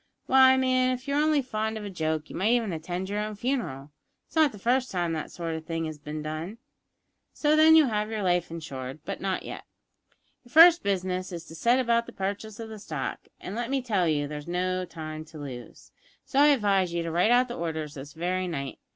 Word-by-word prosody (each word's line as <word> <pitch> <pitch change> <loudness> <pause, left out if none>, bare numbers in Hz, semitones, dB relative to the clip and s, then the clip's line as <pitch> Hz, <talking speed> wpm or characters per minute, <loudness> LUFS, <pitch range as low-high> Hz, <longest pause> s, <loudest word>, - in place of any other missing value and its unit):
Why, 260 0 +6
man, 255 -1 +2
if 255 +2 -12
you 280 - -1
were 290 - +3
only 305 -2 +2
fond 220 -2 -2
of 210 - -6
a - - -5
joke 160 -3 -2
you - - -8
might 210 +6 +2
even 230 -6 +1
attend 175 +3 -4
your 205 +1 -2
own 210 0 -3
funeral! 205 - -3 0.3
It's - - -23
not 310 -3 +5
the 210 - -11
first 250 +5 +1
time 175 -3 -1
that 155 - -4
sort 165 -2 -4
of 160 0 -5
thing 165 -1 -2
has 155 -1 -6
bin 150 +1 -6
done. 155 +7 -5 0.8
So, 300 0 +2
then, 315 +1 +7
you'll 310 -5 +6
have 210 -1 -1
your 220 -2 -3
life 180 -1 +1
insured, 140 -4 -7
but - - -5
not 190 -1 -1
yet. - - -7 0.8
Your 240 - -20
first 335 +2 +9
business 185 -1 -2
is 170 -1 -6
to 160 - -12
set 235 +10 +2
about 235 -2 +1
the 240 - -10
purchase 205 +3 -4
of 225 -1 -6
the 220 -1 -8
stock, - - -5
and, 185 - -7
let 235 +1 -3
me 275 0 +1
tell 210 -8 0
you, 145 -2 +1
there's 150 +1 -7
no 185 +1 -1
time 155 -2 -7
to 155 0 -13
lose, 130 -5 -9 0.3
so 275 - 0
I 290 - +7
advise 200 -10 +3
you 170 0 -1
to 165 - -3
write 175 +6 +3
out 245 +1 +4
the 240 - -6
orders 160 -3 -4
this 140 0 -9
very 180 +3 -1
night. 140 -6 -5
190 Hz, 230 wpm, -27 LUFS, 160-240 Hz, 0.8 s, first